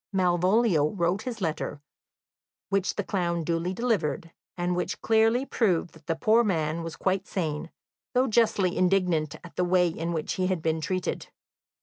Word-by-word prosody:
Malvolio 180 -2 +3
wrote 175 +1 0
his 240 -5 -6
letter, 160 -4 -2 0.9
which 195 -1 0
the - - -1
clown 170 -4 -1
duly 170 +2 -1
delivered, 190 -7 -1 0.3
and 175 0 0
which 180 - -2
clearly 225 +3 +3
proved 185 -10 +1
that 160 -2 -19
the 165 - 0
poor 220 +8 +4
man 165 -5 0
was 165 -1 -6
quite 190 0 -1
sane, 160 -3 -3 0.5
though 255 +1 +4
justly 215 -6 +2
indignant 180 -5 +1
at 175 - -12
the 180 - +2
way 180 0 +3
in 165 0 -3
which 160 -2 -2
he 185 -1 0
had 185 -4 -1
been 160 0 0
treated. 185 +3 -2
180 Hz, 160 wpm, -27 LUFS, 165-195 Hz, 0.9 s, poor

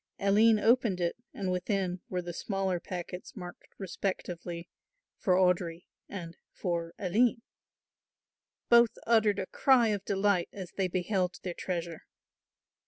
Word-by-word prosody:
Aline 215 +3 +5
opened 225 -4 +3
it 170 -1 0 0.2
and 190 -2 -3
within 180 -1 -1
were 180 -1 -2
the 175 0 -5
smaller 190 -1 -1
packets 180 0 -7
marked 180 -3 -9
respectively, 175 -2 -4 0.5
"For 185 -3 +3
Audry" 180 -2 +2 0.3
and 170 -4 -7
"For 170 -2 -3
Aline." 230 +5 +2 1.2
Both 235 -1 +5
uttered 220 -3 +4
a 190 - -2
cry 245 +1 +4
of 205 -2 -1
delight 200 -3 +1
as 190 -3 -8
they 190 -2 0
beheld 185 0 -1
their 180 - -3
treasure. 170 -2 -4
185 Hz, 125 wpm, -30 LUFS, 175-205 Hz, 1.2 s, Aline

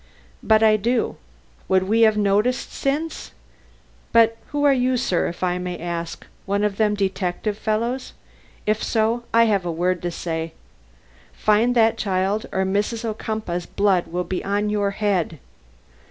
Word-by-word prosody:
"But 220 0 +4
I 215 -1 +5
do. 235 +3 0 0.5
Would 185 0 +3
we 220 +4 +2
have 220 -1 +5
noticed 210 +5 +1
since? 300 +4 -3 0.8
But 225 -1 +5
who 290 0 -2
are 285 -1 +6
you, 255 0 +1
sir, 190 -8 0
if 175 - -6
I 180 0 0
may 180 -1 -4
ask? 170 0 -5 0.2
One 200 +1 0
of 205 -1 0
them 210 -1 +2
detective 195 +1 -1
fellows? 230 +5 -2 0.5
If 215 +1 +1
so, 230 +1 0
I 230 0 +5
have 205 -4 +2
a 175 - -2
word 180 +2 0
to 175 - -2
say: 165 -1 -4 0.8
Find 220 +4 +2
that 225 -1 +3
child 195 +1 0
or 190 - 0
Mrs. 205 +4 -1
Ocumpaugh's 215 -5 -3
blood 195 -3 +1
will 180 +1 -2
be 185 0 -4
on 205 +1 0
your 205 -1 +1
head! 195 -5 -1
210 Hz, 155 wpm, -22 LUFS, 185-225 Hz, 0.8 s, are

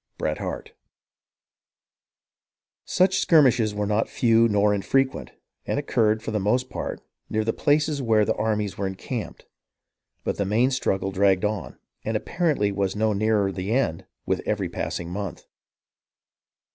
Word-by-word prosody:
— - - -51
Bret - - -2
Harte. - - -5 2.1
Such 190 +1 +2
skirmishes 125 -9 +4
were 105 0 -1
not 105 +2 0
few 115 -4 +4
nor 105 -1 +3
infrequent, 130 +7 0 0.3
and - - -1
occurred, 110 -6 +1
for 115 - -4
the 105 - 0
most 125 +6 0
part, - - -5 0.3
near 110 0 0
the 115 +1 0
places 150 -1 +1
where 110 -4 +3
the - - +1
armies 105 -3 -2
were 100 - 0
encamped. 95 0 -6 0.8
But - - -2
the 100 - +1
main 115 +7 +2
struggle 95 -6 -1
dragged 95 0 +2
on, 105 -5 -3 0.3
and 110 0 0
apparently 145 - 0
was 100 -1 -1
no 110 0 +1
nearer 105 -1 +1
the 95 +3 -3
end 100 -11 0 0.2
with - - 0
every - - -1
passing 85 0 -4
month. 100 -2 -5
110 Hz, 145 wpm, -24 LUFS, 100-125 Hz, 2.1 s, skirmishes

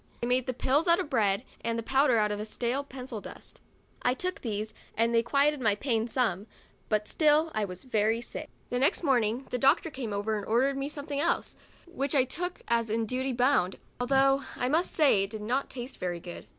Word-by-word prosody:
They 240 - -2
made 250 0 +1
the 255 - -1
pills 285 +7 +2
out 340 0 +6
of 305 -5 -4
bread 210 -3 +2 0.2
and 230 0 -1
the 230 - -3
powder 265 0 +3
out 210 -1 +2
of 210 +1 -3
slate 250 +6 -2
pencil 250 -4 -7
dust. - - -12 0.4
I 250 - +2
took 365 +6 -3
these 215 -2 -3 0.2
and 230 +1 +2
they 230 - +5
quieted 280 +4 +2
my 215 -4 +3
pain 225 -1 0
some, 220 -5 0 0.4
but 215 -1 +1
still 310 +1 +3
I 215 -1 0
was 180 -1 -8
very 225 -2 +1
sick. 240 - -7 0.2
The 245 - 0
next 275 +6 +2
morning 245 -3 +1
the 250 - -1
doctor 285 +5 +3
came 255 -6 -5
and 205 0 -2 0.2
ordered 260 +5 +2
me 275 +1 -3
.something 285 -1 -4
else, 335 +4 0 0.3
which 285 -5 -3
I 265 - +5
took, 355 +8 -4
as 230 -1 +1
in 225 +1 0
duty 260 +4 -1
bound, 245 -7 +2 0.2
although 270 +2 +3
I 250 - -1
must 330 +5 +1
say 280 -10 +4
it 195 - -2
did 215 -1 -6
not 255 +6 -1
taste 250 +1 -7
very 175 -1 -2
good. 175 0 -9
250 Hz, 210 wpm, -29 LUFS, 220-275 Hz, 0.4 s, out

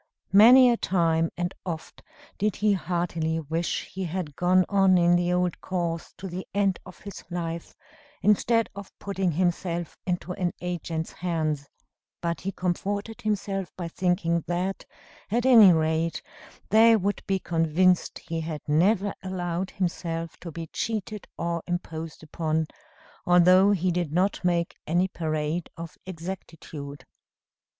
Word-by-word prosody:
Many 245 +5 +8
a 235 - +1
time 165 -4 +1
and 175 +1 -2
oft 165 -3 -6 0.4
did 210 -1 +1
he 210 0 +2
heartily 170 -3 -1
wish 160 +2 -2
he 190 0 -5
had 165 -4 -4
gone 185 +1 +3
on 195 -2 +4
in 175 0 +4
the 175 0 +1
old 180 -1 0
course 170 -3 -3
to 190 - -6
the 185 +1 -6
end 195 -2 +2
of 185 - -12
his 200 -1 -9
life, 170 -1 -4 0.5
instead 225 +2 +3
of 200 -1 -9
putting 195 -3 -1
himself 175 0 -1
into 180 0 -2
an 180 -1 -1
agent's 170 -2 -3
hands; 155 -5 -2 0.5
but 170 -4 -2
he 195 - -3
comforted 200 +4 -3
himself 200 -3 -2
by 175 -2 -4
thinking 170 -2 0
that, 180 +2 -2 0.4
at 235 +4 0
any 225 -7 +9
rate, 160 0 0 0.5
they 225 +2 +7
would 205 -1 -1
be 195 - +2
convinced 175 +1 +2
he 165 -1 -5
had 155 -2 -5
never 190 +6 +2
allowed 185 -1 -3
himself 170 -3 -3
to 170 - -8
be 165 0 -6
cheated 215 -2 -3
or 170 0 -2
imposed 165 -4 -5
upon, 160 0 -1 0.6
although 180 +2 +6
he 185 -3 +2
did 175 -3 -1
not 185 +5 +1
make 170 -1 +1
any 175 +4 +2
parade 155 -1 -2
of 165 -1 -8
exactitude. 165 -5 -8
175 Hz, 140 wpm, -26 LUFS, 165-190 Hz, 0.6 s, any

